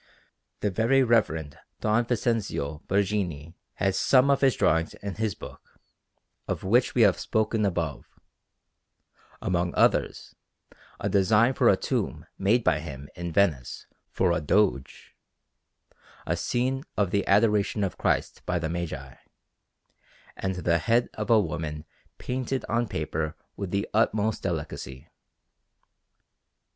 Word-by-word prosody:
The 105 - 0
Very 120 +7 +3
Reverend 80 - +1 0.2
Don 110 +2 +2
Vincenzio 105 - -1
Borghini 95 -6 -1 0.2
has 95 -1 0
some 135 +1 +4
of 140 - +2
his 135 -2 +4
drawings 80 +1 +1
in 100 -1 -6
his 110 0 -2
book, - - -13 0.7
of - - -3
which 120 +6 +2
we 120 - +5
have 100 -4 +4
spoken 110 -1 0
above; 85 -6 -3 1.4
among 90 -1 0
others, - - +1 0.7
a - - -2
design 105 +5 +3
for - - +4
a - - +4
tomb - - -2
made 110 +5 +3
by 75 - +2
him 70 -3 -8
in 85 -1 -5
Venice 80 -9 0 0.2
for 95 -2 +1
a 85 - 0
Doge, 85 -4 0 1.1
a - - 0
scene 130 +2 -1
of 100 -4 +1
the 100 -1 +1
Adoration 105 0 +3
of 95 - -3
Christ - - 0
by 90 - +1
the 80 -2 -2
Magi, 80 -6 -5 1.2
and 95 -1 -3
the 85 -1 +1
head 115 +1 +2
of 105 -1 -5
a 115 -2 +6
woman 80 -4 -3 0.3
painted 130 +1 -3
on 120 +1 0
paper 80 -2 -3 0.2
with 100 -2 -5
the 100 +2 -1
utmost 110 0 +1
delicacy. 75 -7 -5
100 Hz, 130 wpm, -26 LUFS, 80-110 Hz, 1.4 s, a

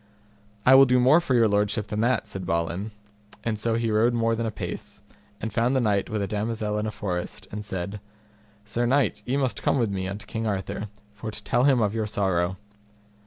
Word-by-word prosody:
I 130 - +7
will 135 0 +8
do 125 0 +4
more 135 +7 +6
for 140 -7 0
your 115 -2 +5
lordship 105 +1 +1
than 105 0 -4
that, 120 0 +2
said 95 - -5
Balin; 85 +3 -1 0.5
and 110 -2 -1
so 115 +1 +1
he 115 -1 0
rode 115 +3 +3
more 115 0 +2
than 115 0 -2
a - - -2
pace, 90 -5 -7 0.4
and 110 -1 -4
found 120 +4 +2
the - - +4
knight 105 -5 +1
with 105 -2 -1
a - - -2
damosel 105 0 -2
in 105 - -2
a - - -1
forest, 90 -4 -4
and 105 0 -5
said, 100 +1 -4 0.7
Sir 120 +3 -1
knight, 135 +2 +2
ye 130 +3 +1
must 130 -7 -1
come - - +2
with 115 -5 +1
me 95 -1 -2
unto 100 +2 -6
King 110 0 -3
Arthur, 100 +1 -3 0.3
for 105 +1 -6
to 105 - -6
tell 120 +2 +2
him 135 -4 +4
of 105 -1 +1
your 110 -1 -1
sorrow. 95 -3 0
110 Hz, 215 wpm, -25 LUFS, 100-120 Hz, 0.7 s, will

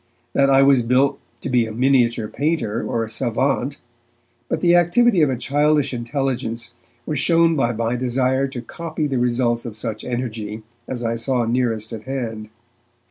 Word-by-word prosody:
that 135 0 +3
I 135 0 +6
was 135 -2 +5
built 125 +4 +2 0.2
to - - -4
be 120 -3 +3
a - - -6
miniature 120 -2 +2
painter 125 -6 -1
or 115 - -1
a - - -4
savant, 130 +4 -1 0.7
but - - 0
the 175 -1 +4
activity 180 +3 +4
of 150 - +4
a 130 - -1
childish 145 +2 +1
intelligence 120 -2 -3 0.3
was 150 -3 -2
shown 165 +2 +3
by 120 -5 +1
my 115 +1 -1
desire 130 +2 +1
to 130 -3 -7
copy 160 +3 -4
the 135 -4 -1
results 120 -1 +1
of 115 -3 -7
such 110 -1 -5
energy 110 -3 -4 0.2
as 120 -2 -4
I 115 0 -1
saw 125 0 0
nearest 115 -2 -1
at 110 -1 -7
hand. 115 -5 -4
125 Hz, 170 wpm, -21 LUFS, 115-140 Hz, 0.7 s, I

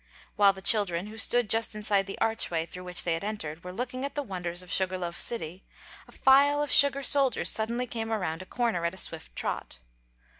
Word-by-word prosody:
While 200 -1 +5
the 190 0 -12
children, 195 -5 +4
who 215 +1 -11
stood 240 0 +2
just 225 +1 +1
inside 205 -2 0
the 195 - -7
archway 175 -7 0
through 180 +2 -11
which 180 -1 +1
they 170 - -1
had 165 - -4
entered, 165 -7 -6
were 180 - -8
looking 255 +5 -5
at 280 0 -5
the 290 - -2
wonders 180 -5 -4
of 180 - -12
Sugar 185 0 0
Loaf 175 -1 -5
City, 185 -5 -1 0.4
a - - -17
file 285 +2 +3
of 290 - -4
sugar 280 0 +6
soldiers 270 -3 +2
suddenly 235 +3 0
came 225 -2 -5
around 180 -6 -3
a 185 - -11
corner 230 -8 -2
at 170 +2 -2
a - - -14
swift 165 -3 -4
trot. 60 - -5
205 Hz, 215 wpm, -27 LUFS, 180-240 Hz, 0.4 s, sugar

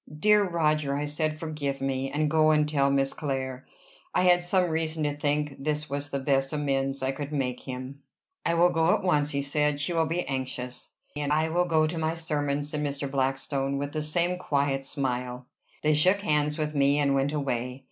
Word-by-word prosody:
"Dear 210 +1 +4
Roger," 155 -4 +1
I 145 - -1
said, 155 +1 -1
"forgive 150 -4 -3
me, 135 0 -1
and 150 +2 0
go 155 0 +4
and 150 -1 +3
tell 140 -2 +2
Miss 135 0 +1
Clare." 130 -3 -4 0.5
I - - +3
had 175 -1 +5
some 180 -1 +2
reason 160 -1 -1
to 145 -1 0
think 145 -1 -1
this 150 0 -1
the 140 0 -3
best 135 0 +1
amends 135 -2 -1
I 130 - +1
could 145 +2 -6
make 130 -4 -2
him. 130 +2 -6 0.4
"I 170 - +1
will 175 +1 +5
go 165 +1 +3
at - - -4
once," 150 -5 +2
he 140 -1 -1
said. 150 +1 +1
"She 150 +4 -1
will 165 -1 +2
be 170 +2 -1
anxious." 130 -2 -4 0.2
"And 145 0 -2
I 155 +2 +2
will 175 +2 +2
go 160 -2 +3
to 165 +1 -3
my 160 +1 0
sermon," 145 -3 -1
said 150 +1 -2
Mr. 140 -1 -3
Blackstone, 135 +1 -1
with 145 +1 -3
the 155 - -2
same 175 +4 0
quiet 140 -4 0
smile. 125 -3 -3 0.4
They 155 0 +4
shook 185 +7 +3
hands 150 -4 +1
with 155 -1 -2
me, 140 0 +3
and 140 -1 +2
went 135 +1 +1
away. 125 -3 -2
145 Hz, 200 wpm, -27 LUFS, 135-155 Hz, 0.5 s, had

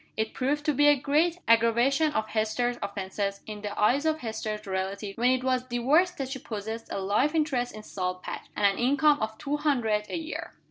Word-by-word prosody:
It 220 0 -1
proved 290 +3 -1
to 300 - +2
be 290 +2 +4
a 290 - +7
great 310 +5 +2
aggravation 235 +7 +4
of 220 -6 -1
Hester's 220 +3 0
offenses, 200 0 -3
in 210 -1 -7
the 205 -1 -5
eyes 250 +7 +3
of 315 0 0
Hester's 220 -2 -4
relatives, 195 +1 -3
when 245 +2 +2
it 255 0 +1
was 255 -1 +1
discovered 255 +8 +3
that 270 -3 -3
she 265 0 -5
possessed 220 0 -6
a - - -2
life 215 +11 +1
interest 275 -6 0
in 215 - -9
Salt 185 -2 -4
Patch, - - -6
and 205 - +1
an 195 -1 +3
income 285 +4 +3
of 220 0 -3
two 295 0 -2
hundred 235 -8 +1
a - - -2
year. 325 0 -6
240 Hz, 205 wpm, -27 LUFS, 210-285 Hz, -, a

